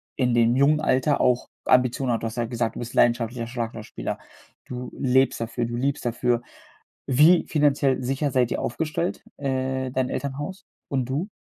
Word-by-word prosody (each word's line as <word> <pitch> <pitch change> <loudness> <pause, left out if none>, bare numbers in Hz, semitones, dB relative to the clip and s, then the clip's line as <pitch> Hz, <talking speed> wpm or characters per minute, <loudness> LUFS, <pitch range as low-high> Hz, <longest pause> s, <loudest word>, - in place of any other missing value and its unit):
in 125 -2 +1
dem 120 0 +4
jungen 140 +3 +4
Alter 140 0 +2
auch 125 0 +2 0.2
Ambitionen 125 +1 +3
hat. 115 - -2
Du - - 0
hast 115 +2 -7
ja 120 - 0
gesagt, 115 -1 -2
du - - -6
bist 120 0 -6
leidenschaftlicher 120 0 +2
Schlagzeugspieler. 115 - -5 0.5
Du 125 0 -6
lebst 130 0 +2
dafür 115 +1 -2
du 120 0 -4
liebst 135 +3 -1
dafür. 120 0 +1 0.7
Wie 150 +7 +5
finanziell 140 -3 +2
sicher 135 +3 -1
seid 125 -2 +2
ihr - - -1
aufgestellt, 160 +6 -2
äh, 130 -1 -2
dein 130 0 0
Elternhaus 145 +8 -4 0.2
und 130 -3 0
du? 150 +10 -2
130 Hz, 170 wpm, -24 LUFS, 120-140 Hz, 0.7 s, Wie